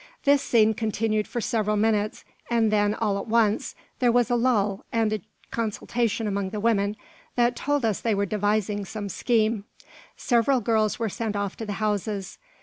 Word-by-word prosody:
This 285 0 +4
scene 220 -2 +3
continued 215 -1 -1
for 240 - -3
several 215 -2 0
minutes; 215 -1 0 0.2
and 230 -2 +2
then, 205 0 +2
all 205 -3 0
at - - -6
once, 220 -2 +1 0.2
there 245 -2 +4
was 245 -1 +2
a - - +4
lull, 215 -5 +1
and 225 -2 +1
a 215 - -2 0.3
consultation 230 0 -1
among 200 -2 -1
the 210 +1 -4
women, 205 -2 +1 0.4
that 240 0 +2
told 290 -3 0
us 215 -4 0
they 225 -3 +1
were 200 0 +1
devising 205 0 0
some 205 +1 -6
scheme. 220 0 +1 0.5
Several 250 +2 +2
girls 220 -1 +1
were 230 - -1
sent 215 +1 -3
off 200 -1 -2
to 225 - -6
the 205 - -2
houses. 205 -1 -2
215 Hz, 175 wpm, -25 LUFS, 205-230 Hz, 0.5 s, This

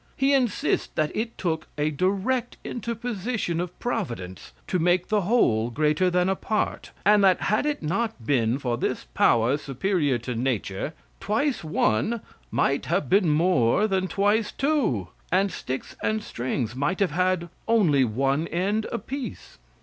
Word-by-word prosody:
He 270 +1 +3
insists 250 -6 +1
that 155 -1 0
it 225 +1 -3
took 160 -3 -2
a 150 +1 +1
direct 200 - 0
interposition 230 -6 -3
of 175 0 -4
providence 120 - -4
to 185 - -1
make 175 +2 +2
the 210 -1 +2
whole 120 - +2
greater 155 +7 +2
than 180 0 +2
a 190 - +2
part, 215 +2 -2 0.2
and 205 0 +5
that 190 -2 +5
had 215 +8 +1
it 295 - -2
not 195 - -2
been 120 -2 +2
for 125 -4 -2
this - - -1
power 120 +4 +3
superior 145 0 0
to 125 +2 -5
nature, 120 +2 -2 0.2
twice 240 +5 0
one 155 - +1 0.3
might 140 +1 0
have 175 +4 0
been 190 -3 +4
more 155 - +3
than 190 -2 0
twice 205 +3 +1
two, 255 - 0 0.2
and 190 +2 +2
sticks 130 +1 -5
and 215 0 0
strings 120 - -3
might 145 +8 -1
have 195 -5 +2
had 180 +1 0 0.2
only 180 -12 +4
one 135 +7 0
end 200 +6 0
apiece. 240 - -6
180 Hz, 150 wpm, -25 LUFS, 140-215 Hz, 0.3 s, and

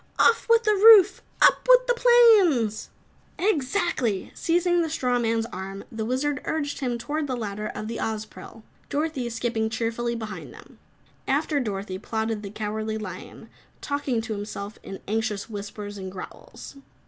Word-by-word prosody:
"Off 460 - +3
with 460 0 +5
the 425 -1 +3
roof! 405 -2 +7 0.2
Up - - +4
with - - +7
the - - +2
planes!" 430 - +4 0.5
"Exactly!" 295 - 0
Seizing 350 +1 +1
the 325 - -1
Straw 250 -5 0
Man's 225 -1 0
arm, 195 +2 -6
the 225 -1 -4
Wizard 260 +3 -1
urged 295 -2 -2
him 250 -4 -2
toward 290 +6 -3
the 255 - -2
ladder 210 -2 -4
of 215 - -5
the 230 0 -4
Ozpril, 220 0 -6 0.3
Dorothy 285 -5 -2
skipping 225 -1 -2
cheerfully 230 +1 -2
behind 220 -2 -7
them. - - -16 0.5
After 295 -2 +1
Dorothy 195 -5 -4
plodded 220 0 -3
the 200 - -7
Cowardly 215 +1 -3
Lion, 185 -4 -9 0.3
talking 285 -5 -2
to 225 -1 -4
himself 205 0 -6
in 195 - -9
anxious 220 0 -2
whispers 205 0 -7
and 190 -1 -6
growls. 190 +8 -10
230 Hz, 150 wpm, -25 LUFS, 215-310 Hz, 0.5 s, roof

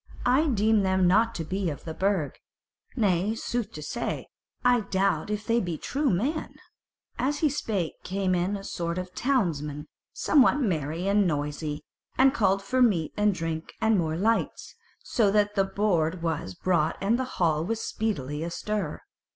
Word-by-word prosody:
I 265 +6 +4
deem 220 -4 +3
them 190 -1 +2
not 225 +5 +3
to 165 - -3
be 185 +2 -2
of 145 - -6
the 160 - -5
Burg. 190 -5 -1 0.6
Nay, 200 -1 +1
sooth 230 -1 -3
to 150 - -7
say, 235 - -3 0.4
I 245 -1 +5
doubt 195 -4 0
if 210 0 -3
they 230 0 +2
be 175 -6 -3
true 280 - -1
men." 265 - -1 0.6
As 275 +4 +1
he 310 - +4
spake 210 - -3
came 190 0 -1
in 180 +3 0
a 195 - -9
sort 170 -3 -3
of 185 0 -4
the - - -34
townsmen 155 - 0 0.3
somewhat 285 -2 +4
merry 170 - -1
and 200 -1 +3
noisy, 150 0 -3 0.3
and 265 0 +5
called 195 -6 +2
for 255 +6 0
meat 185 -10 +3
and 210 0 +3
drink 165 -1 -4
and 220 -1 +3
more 160 -4 0
lights; 225 +5 0 0.3
so 220 -5 +2
that 205 0 +2
the 195 -1 +2
board 185 -4 0
was 155 - -2
brought 170 - +1
and 215 +6 +1
the - - +1
hall 160 -3 +2
was 220 +5 -2
speedily 150 -13 -2
astir. 205 +5 -3
195 Hz, 170 wpm, -27 LUFS, 165-225 Hz, 0.6 s, I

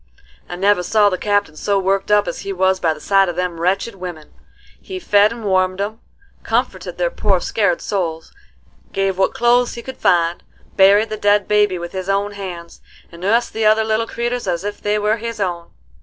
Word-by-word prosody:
"I 175 - -5
never 195 +1 +2
saw 205 +3 +3
the 185 - -1
Captain 205 -6 0
so 200 +5 0
worked 195 +1 0
up 210 0 +3
as - - -4
he 200 - -5
was 190 0 +1
by 165 - +1
the 155 - -5
sight 195 +2 +3
of 175 - -4
them 180 -2 -3
wretched 190 +6 0
women. 175 -5 -9 0.5
He 380 - -7
fed 210 - +3
and 230 -1 -8
warmed 185 -1 +1
'em, 210 +3 -3 0.4
comforted - - -2
their - - 0
poor 200 - +1
scared 195 -2 0
souls, 165 -5 -3 0.6
give 195 -1 -1
what 190 - +1
clothes 240 +1 +2
we 235 - -8
could 260 - -8
find, 170 -1 +2 0.3
buried 200 +3 +5
the 215 - -3
dead 205 -1 +2
baby 210 -3 +2
with 175 0 -6
his 190 0 -5
own 200 +1 0
hands, 180 -4 -8 0.3
and 170 0 -13
nussed 230 +5 +1
the 220 -1 +1
other 215 +1 +4
little 220 +1 0
creeters 240 -1 -3
as 175 0 -1
if 205 0 -5
they 210 0 0
were 210 +1 +1
his 230 0 -6
own. 175 -3 -3
200 Hz, 200 wpm, -19 LUFS, 180-215 Hz, 0.6 s, buried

